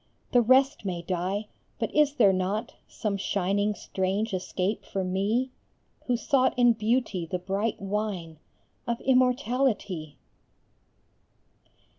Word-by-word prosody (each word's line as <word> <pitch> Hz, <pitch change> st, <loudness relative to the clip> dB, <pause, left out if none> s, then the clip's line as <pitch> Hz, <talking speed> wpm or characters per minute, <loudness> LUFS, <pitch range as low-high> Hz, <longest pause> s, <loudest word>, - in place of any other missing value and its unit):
The 245 Hz, -, +5 dB
rest 260 Hz, +2 st, +4 dB
may 180 Hz, -3 st, -3 dB
die 185 Hz, +4 st, -2 dB, 0.3 s
but -, -, -3 dB
is 295 Hz, -1 st, +3 dB
there 200 Hz, -7 st, +5 dB
not 195 Hz, +5 st, -2 dB
Some 205 Hz, -2 st, -3 dB
shining 200 Hz, +2 st, 0 dB
strange 195 Hz, +4 st, -2 dB
escape 185 Hz, +2 st, -2 dB
for 195 Hz, -1 st, -3 dB
me 205 Hz, +8 st, 0 dB, 0.6 s
Who 245 Hz, -2 st, +2 dB
sought 260 Hz, +1 st, +2 dB
in 245 Hz, -1 st, +6 dB
Beauty 215 Hz, -5 st, 0 dB
the 180 Hz, -, -2 dB
bright 195 Hz, +4 st, -2 dB
wine 195 Hz, -5 st, -3 dB, 0.5 s
Of 235 Hz, -1 st, -1 dB
immortality? 250 Hz, -, +1 dB
205 Hz, 115 wpm, -27 LUFS, 185-245 Hz, 0.6 s, in